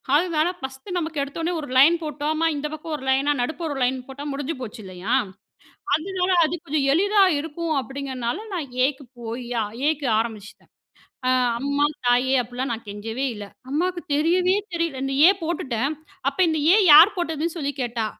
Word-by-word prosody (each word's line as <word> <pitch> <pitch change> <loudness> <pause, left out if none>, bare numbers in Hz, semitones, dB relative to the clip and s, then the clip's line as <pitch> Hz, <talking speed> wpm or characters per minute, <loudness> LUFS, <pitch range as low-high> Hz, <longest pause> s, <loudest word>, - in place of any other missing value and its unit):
அதனால 325 0 +2
பஸ்ட்டு 265 +8 -6
நமக்கு 320 -3 -3
எடுத்த 280 +3 -5
ஒட்னே 340 +2 -1
1 290 - -7
லைன் 295 +6 +7
போட்டோமா, 305 +2 -1
இந்த 290 +1 -3
பக்கம் 310 +1 -6
1 265 - -11
லைனா 275 +2 +2
நடுப்புற 315 +6 -3
1 270 - -4
லைன் 255 0 -1
போட்டா 275 +1 -8
முடிஞ்சு 285 +3 -3
போச்சுல்லையா? 210 -3 -5 0.8
அதனால 365 +4 0
அது 310 +2 -1
கொஞ்சம் 295 -3 0
எளிதா 400 +6 +4 0.2
இருக்கும் 320 +1 -3
அப்படிங்கிறனால 265 -1 -4 0.2
நான் 330 -6 -3 0.2
A - - +2
க்கு 280 - -14 0.2
போய் 235 +2 -5 0.4
A - - +5
க்கு 285 - -4
ஆரம்பிச்சுட்டேன். 220 -2 -6 0.9
அம்மா 280 +2 +1 0.2
தாயே 250 +2 +3
அப்டிலாம் 245 +3 -4
நான் 230 0 -4
கெஞ்சவே 225 +5 -5
இல்ல. 205 -1 -7 0.2
அம்மாவுக்கு 350 +5 -1
தெரியவே 355 +5 +2 0.2
தெரியல 335 -5 -2
இந்த 270 0 -2
A - - +8
போட்டுட்டேன். 275 -5 -1 0.4
அப்போ 280 - -16
இந்த 315 -1 0 0.2
A - - +5 0.2
யார் 335 +8 +9
போட்டதுன்னு 325 -1 -2
சொல்லி 285 -3 -2
கேட்டா. 235 -2 -2
285 Hz, 165 wpm, -23 LUFS, 255-325 Hz, 0.9 s, யார்